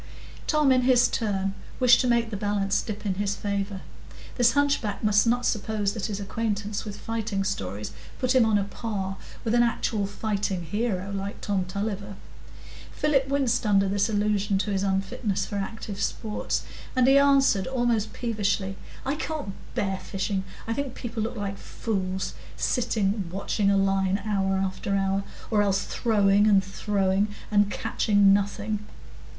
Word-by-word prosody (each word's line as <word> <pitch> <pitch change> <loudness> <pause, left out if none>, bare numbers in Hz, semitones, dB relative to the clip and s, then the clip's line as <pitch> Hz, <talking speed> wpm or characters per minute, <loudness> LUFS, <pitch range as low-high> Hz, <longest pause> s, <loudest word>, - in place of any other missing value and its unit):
Tom, 300 -3 +4
in 255 -1 +5
his 250 -1 +5
turn, 195 -3 -1 0.3
wished 250 -2 +6
to 255 - 0
make 235 -2 +2
the - - -3
balance 200 -1 0
dip 215 -1 -6
in 195 - +1
his 200 0 0
favour. 200 -1 -3 0.5
This 240 -2 +4
hunchback 280 -8 +1
must 210 +1 +4
not 245 +1 +2
suppose 210 -2 0
that 220 -1 -3
his 205 -2 -4
acquaintance 205 0 -2
with 205 -1 -6
fighting 220 -3 -2
stories 105 - -3 0.3
put 255 0 +1
him 255 -2 +6
on 220 -2 +3
a 200 - +1
par 195 -2 -4 0.3
with 225 - 0
an 240 - +5
actual 225 -3 0
fighting 200 -3 -2
hero, 200 +1 -2
like 200 0 -4
Tom 195 -3 -1
Tulliver. 200 +1 -4 0.8
Philip 275 -3 +1
winced 270 -4 +1
under 200 -2 +3
this 200 +2 +1
allusion 205 -1 +1
to 195 +2 -1
his 195 -1 0
unfitness 195 +1 -1
for 205 - -4
active 200 0 -5
sports, 215 -2 -2 0.3
and 255 -1 +4
he 270 +2 +6
answered 275 -8 +4
almost 240 -4 0
peevishly,— 205 -4 -1 0.3
"I 270 - +1
can't 300 -8 -4 0.2
bear 195 -1 -1
fishing. 195 0 -2 0.2
I 225 - -1
think 270 0 -3
people 230 -2 -4
look 225 +3 -2
like 200 -2 -4
fools 190 -4 -3 0.2
sitting 210 -6 0
watching 200 +1 0
a 200 - +4
line 195 0 +2
hour 195 -2 +1
after 190 +1 -1
hour, 195 0 +1 0.3
or 210 -2 +4
else 200 -1 +2
throwing 205 -3 +3
and 200 -2 +5
throwing, 195 0 0 0.2
and 205 -1 +4
catching 205 -1 +3
nothing." 205 +1 -1
205 Hz, 160 wpm, -26 LUFS, 195-230 Hz, 0.8 s, wished